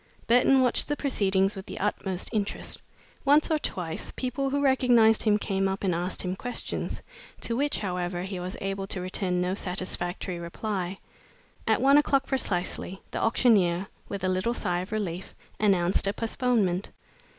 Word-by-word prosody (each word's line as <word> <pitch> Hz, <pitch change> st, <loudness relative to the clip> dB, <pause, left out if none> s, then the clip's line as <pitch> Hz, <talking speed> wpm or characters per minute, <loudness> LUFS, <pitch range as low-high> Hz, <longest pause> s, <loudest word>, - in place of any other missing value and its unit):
Burton 255 Hz, +3 st, +5 dB
watched 250 Hz, -, +2 dB
the 295 Hz, -, 0 dB
proceedings 195 Hz, -7 st, +1 dB
with 190 Hz, 0 st, -8 dB
the -, -, -6 dB
utmost 190 Hz, -2 st, -2 dB
interest. 210 Hz, -2 st, -2 dB, 0.4 s
Once 290 Hz, +3 st, +4 dB
or 310 Hz, -, +3 dB
twice 170 Hz, -, -2 dB
people 270 Hz, +2 st, -1 dB
who 285 Hz, +1 st, 0 dB
recognized 245 Hz, -5 st, +5 dB
him 210 Hz, -2 st, +3 dB
came 195 Hz, -2 st, 0 dB
up 195 Hz, +1 st, -3 dB
and 185 Hz, -3 st, +2 dB
asked 175 Hz, +2 st, -2 dB
him 185 Hz, 0 st, -2 dB
questions, 245 Hz, +5 st, -4 dB, 0.4 s
to 230 Hz, -, -2 dB
which, 285 Hz, +4 st, +1 dB
however, 180 Hz, -2 st, -2 dB
he 190 Hz, -1 st, -4 dB
was 180 Hz, +1 st, -5 dB
able 195 Hz, 0 st, -3 dB
to 190 Hz, -, -2 dB
return 180 Hz, 0 st, -1 dB
no 180 Hz, +1 st, 0 dB
satisfactory 180 Hz, -1 st, -3 dB
reply. 185 Hz, +2 st, -3 dB, 0.7 s
At -, -, +2 dB
one 280 Hz, +2 st, +7 dB
o'clock 275 Hz, -2 st, +2 dB
precisely, 190 Hz, -6 st, -1 dB
the -, -, -3 dB
auctioneer, 200 Hz, -6 st, +3 dB, 0.2 s
with 200 Hz, -2 st, -5 dB
a -, -, +2 dB
little 185 Hz, +6 st, 0 dB
sigh 175 Hz, -5 st, 0 dB
of 185 Hz, +3 st, -6 dB
relief, 190 Hz, -4 st, -3 dB, 0.2 s
announced 190 Hz, -2 st, +3 dB
a 200 Hz, -, +1 dB
postponement. 225 Hz, -5 st, 0 dB
195 Hz, 160 wpm, -27 LUFS, 180-235 Hz, 0.7 s, one